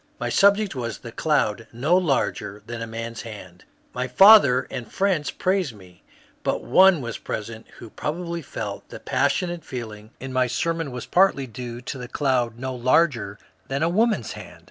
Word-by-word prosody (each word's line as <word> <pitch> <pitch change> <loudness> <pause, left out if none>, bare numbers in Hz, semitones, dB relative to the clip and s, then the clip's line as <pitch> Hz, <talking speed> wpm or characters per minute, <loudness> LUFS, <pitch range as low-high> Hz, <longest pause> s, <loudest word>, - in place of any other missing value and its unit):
My - - -2
subject 200 +1 +3
was 115 -5 -4
the 115 - -10
*^ - - -26
cloud 115 -8 0
no 140 +9 +1
larger 135 - 0
than 120 0 -6
a 115 - -4
tkian's 115 0 -6
hand.'' 95 -5 -11 0.3
My 125 +1 -2
father 140 - +7
and 120 -3 -6
friends 190 -6 0
praised 185 - -1
me, 90 -3 -17 0.4
but - - -1
one 185 -6 +5
waa 120 - -4
present 110 +1 -6
who 115 - -11
probably 170 +2 -4
felt - - -6
that - - -10
the - - -8
passionate 175 -2 0
feeling 110 -4 -7
in 130 0 -7
my 130 -1 +2
sermon 165 +5 -1
was 125 -1 -6
partly 180 -7 +3
due 120 0 -7
to 130 +2 -6
the 125 - -6
cloud 125 -5 0
no 130 +1 -4
larger 125 -5 +1 0.3
than 135 +3 -1
a 165 - +2
woman's 220 +5 +1
hand. - - -10
130 Hz, 180 wpm, -24 LUFS, 115-170 Hz, 0.4 s, father